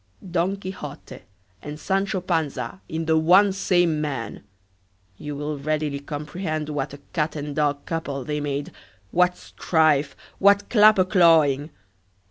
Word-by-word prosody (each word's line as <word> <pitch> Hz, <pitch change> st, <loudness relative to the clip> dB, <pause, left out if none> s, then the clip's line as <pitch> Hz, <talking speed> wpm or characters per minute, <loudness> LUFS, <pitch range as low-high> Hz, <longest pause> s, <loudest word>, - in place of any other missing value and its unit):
Don 180 Hz, +3 st, 0 dB
Quixote 185 Hz, -7 st, -8 dB, 0.4 s
and 150 Hz, +1 st, -8 dB
Sancho 195 Hz, +1 st, -1 dB
Panza 165 Hz, +1 st, -2 dB
in 160 Hz, +1 st, -3 dB
the 160 Hz, 0 st, +3 dB
one 190 Hz, +5 st, +5 dB
same 175 Hz, -5 st, +1 dB
man! 135 Hz, -8 st, -4 dB, 0.8 s
you 150 Hz, -1 st, -6 dB
will 145 Hz, 0 st, -4 dB
readily 150 Hz, -1 st, -2 dB
comprehend 150 Hz, +2 st, -4 dB
what 140 Hz, -2 st, -3 dB
a 140 Hz, -, -16 dB
cat 155 Hz, -1 st, -1 dB
and 145 Hz, -1 st, -5 dB
dog 145 Hz, -1 st, 0 dB
couple 145 Hz, -5 st, -4 dB
they 150 Hz, +3 st, -3 dB
made! 145 Hz, -1 st, -3 dB, 0.4 s
what 180 Hz, 0 st, +2 dB
strife! 155 Hz, -4 st, +1 dB, 0.2 s
what 200 Hz, +1 st, +4 dB
clapper 210 Hz, -4 st, +6 dB
clawing! 160 Hz, -6 st, +4 dB
155 Hz, 130 wpm, -23 LUFS, 145-180 Hz, 0.8 s, clapper